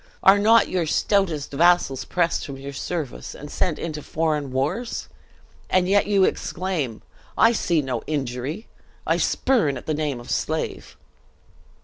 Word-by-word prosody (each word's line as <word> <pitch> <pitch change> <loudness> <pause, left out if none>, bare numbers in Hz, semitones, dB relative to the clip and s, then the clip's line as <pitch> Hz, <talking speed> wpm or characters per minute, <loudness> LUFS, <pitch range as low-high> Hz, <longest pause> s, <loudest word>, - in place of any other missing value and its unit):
Are 195 +1 +7
not 225 +3 +5
your 175 -3 -1
stoutest 170 -5 +1
vassals 165 -3 +3
pressed 170 -2 0
from 140 -1 -7
your 140 +1 -7
service, 150 0 -5
and 145 +1 -9
sent 170 -5 0
into 155 -2 -4
foreign 150 -3 -1
wars? 150 - -2 0.6
And 185 -1 +3
yet 200 +1 +3
you 200 -2 +3
exclaim, 165 - -2 0.3
'I 225 - +6
see 175 -8 +1
no 130 -1 -2
injury 140 - -3 0.4
I - - +2
spurn 205 - +1
at - - -10
the 155 - -1
name 150 -4 -2
of 120 - -9
slave!'" - - -3
155 Hz, 145 wpm, -23 LUFS, 140-190 Hz, 0.6 s, Are